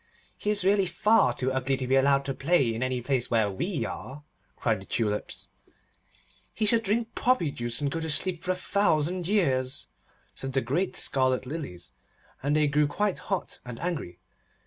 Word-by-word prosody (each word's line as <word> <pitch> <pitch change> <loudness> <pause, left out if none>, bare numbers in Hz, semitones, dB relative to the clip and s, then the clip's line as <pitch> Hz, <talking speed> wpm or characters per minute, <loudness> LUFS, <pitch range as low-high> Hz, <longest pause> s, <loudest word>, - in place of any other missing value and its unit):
'He 210 - -3
is 205 -3 +1
really 195 -1 +4
far 175 - +3
too 130 0 -1
ugly 130 +1 0
to 130 - -3
be 130 +2 +2
allowed 140 +1 +3
to 135 - -2
play 140 -5 +2
in 115 - -4
any 130 -1 -1
place 130 0 0
where 110 -3 +2
we 150 - -2
are,' 130 +9 -7 0.3
cried 115 -5 0
the - - -11
Tulips. 105 -2 -2 1.1
'He 220 - 0
should 225 +2 +4
drink 225 +2 -1
poppy 245 - +2
juice, 120 0 -2
and 140 -1 0
go 165 - -2
to 160 0 -3
sleep 175 +2 0
for - - -7
a 185 - +3
thousand 180 -2 +1
years,' 135 -11 +1 0.4
said 135 0 -5
the 135 - +2
great 145 +11 -1
scarlet 130 -1 +2
Lilies, 125 - -6 0.5
and 145 +2 +1
they 155 0 +4
grew 145 +1 +3
quite 205 +6 -1
hot 195 -3 -2
and 120 -2 -8
angry. 150 - -3
140 Hz, 185 wpm, -27 LUFS, 130-180 Hz, 1.1 s, really